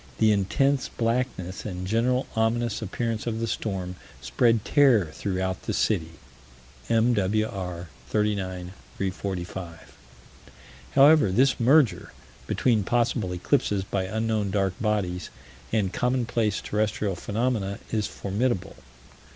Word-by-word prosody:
"The 110 -1 +4
intense 130 +8 +1
blackness 115 -6 -2
and 90 -3 -5
general 120 +6 +1
ominous 115 0 0
appearance 115 +2 -3
of 115 -1 -2
the 115 - 0
storm 95 -5 -3 0.2
spread 110 - +2
terror 125 - +4
throughout 95 -2 -2
the - - -3
city." 85 -6 0 0.8
(M.W.R., 105 -5 0 0.2
39 95 -4 -1 0.2
345.) 95 -3 -5 1.0
However, 140 -6 +6
this 130 +7 +3
merger 120 - +3 0.3
between 115 -5 +2
possible 120 -3 0
eclipses 95 +2 0
by 95 -1 -2
unknown 110 0 -1
dark 95 -1 0
bodies 100 -5 -1 0.4
and 100 -4 0
commonplace 120 -4 0
terrestrial 105 -2 -1
phenomena 105 0 -1
is 110 -2 0
formidable. 100 -1 -2
105 Hz, 105 wpm, -26 LUFS, 95-115 Hz, 1.0 s, However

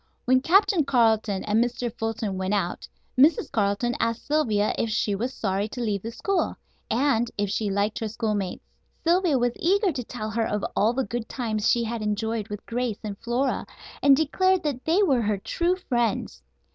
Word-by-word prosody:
When 255 +1 +4
Captain 370 +1 +4
Carleton 220 -6 +2
and 215 +2 +2
Mr. 245 -1 -3
Fulton 225 -3 -3
went 190 +2 -1
out 180 -3 -2 0.3
Mrs. 290 +5 +4
Carleton 205 +3 +1
asked 230 0 -1
Sylvia 225 -9 +1
if 230 - -1
she 215 -1 0
was 235 +6 -2
sorry 200 -3 -1
to 235 - -8
leave 210 -5 -1
the 225 - -5
school, 380 - -1 0.3
and 240 -1 +2
if 205 -1 0
she 210 0 -1
liked 200 +2 0
her 225 - -2
schoolmates. 210 -4 -3 0.4
Sylvia 340 -3 +3
was 245 -1 +1
eager 390 +3 +2
to 260 -5 -4
tell 215 -2 -5
her 225 +2 0
of 210 -1 -2
all 220 +3 +3
the 265 +1 -1
good 235 +2 -4
times 220 -4 -1
she 235 - +3
had 230 0 -3
enjoyed 215 +1 -2
with 210 -1 -7
Grace 240 -2 -2
and 210 -2 -4
Flora, 250 +3 -1 0.3
and 275 -1 +6
declared 370 +5 +2
that 280 -5 -3
they 345 +6 +3
were 270 -10 +3
her 210 -2 0
true 340 - 0
friends. 240 - -1
230 Hz, 185 wpm, -25 LUFS, 210-265 Hz, 0.4 s, and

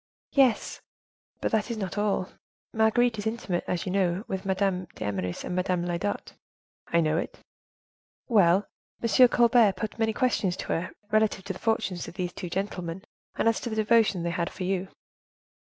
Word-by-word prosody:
"Yes, 265 -5 +2 0.6
but - - 0
that 220 +1 +1
is 235 - -3
not 195 -4 -4
all: 205 -3 0 0.4
Marguerite 220 +1 +3
is 205 - -2
intimate, 215 -6 -2
as 175 - -2
you 185 - -2
know, 190 +1 0
with 190 0 -4
Madame 190 -1 0
d'Eymeris 95 -3 -3
and 180 - -4
Madame 180 -1 0
Lyodot." 175 +4 -3 0.5
"I 170 - +2
know 155 0 +1
it." - - -5 0.9
"Well, 200 -4 +4 0.4
M. 235 +2 +6
Colbert 235 -3 +5
put 215 +1 -5
many 220 0 +2
questions 210 -7 +1
to - - -6
her, 165 - -2 0.2
relative 215 -3 +2
to 195 - -3
the 185 - -11
fortunes 200 -5 -1
of - - -10
these 180 -2 -3
two 180 -2 -6
gentlemen, 185 -1 -4 0.3
and - - +1
as 230 - +3
to 240 - -4
the 220 - -3
devotion 215 -4 +3
they 170 - -1
had 170 0 -1
for 185 - -7
you." 190 0 -1
195 Hz, 175 wpm, -27 LUFS, 180-220 Hz, 0.9 s, M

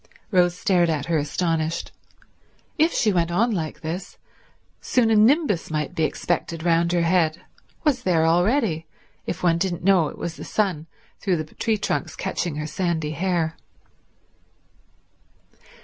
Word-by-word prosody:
Rose 175 -2 +3
stared 180 -5 +2
at 150 -3 -1
her 165 -2 +1
astonished. 165 +1 -1 0.9
If 320 +2 +4
she 215 -3 +2
went 170 -2 +1
on 220 +8 +2
like 160 -7 -3
this, 175 +4 -5 0.6
soon 235 -3 +2
a - - +4
nimbus 225 - +3
might 155 +1 -2
be 160 -3 +1
expected 165 0 -2
round 170 0 +2
her 175 -1 +2
head, 165 -2 +2 0.4
was 285 -6 +2
there 170 -7 +2
already, 175 - +2 0.4
if 165 - -4
one 170 -1 +3
didn't 175 -2 -2
know 185 -4 +4
it - - -9
was 170 -1 -5
the - - -7
sun 180 -7 -1 0.3
through 185 -3 0
the 155 -1 -6
tree 220 -2 0
trunks 205 - -2
catching 175 -4 -3
her 150 0 -3
sandy 160 -2 -2
hair. 165 0 -1
175 Hz, 150 wpm, -23 LUFS, 160-195 Hz, 0.9 s, If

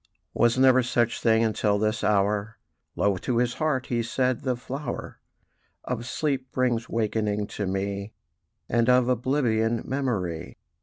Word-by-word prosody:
"Was 120 +1 +3
never 130 -1 +6
such 120 -1 0
thing 115 -1 +4
until 105 -2 +1
this 110 +1 -1
hour," 105 +1 +1 0.4
Low 100 -2 +1
to 120 +6 -2
his 120 0 +1
heart 145 -5 +1
he 120 -1 -1
said; 125 +2 0
"the 130 -2 0
flower 135 +4 -6 0.6
Of 120 -1 -4
sleep 135 -3 -2
brings 125 -2 0
wakening 105 -2 0
to 100 - -3
me, 100 +2 -3 0.6
And 120 0 +2
of 125 -1 +5
oblivion 120 -3 +1
memory. 100 - -3
115 Hz, 140 wpm, -26 LUFS, 105-125 Hz, 0.6 s, never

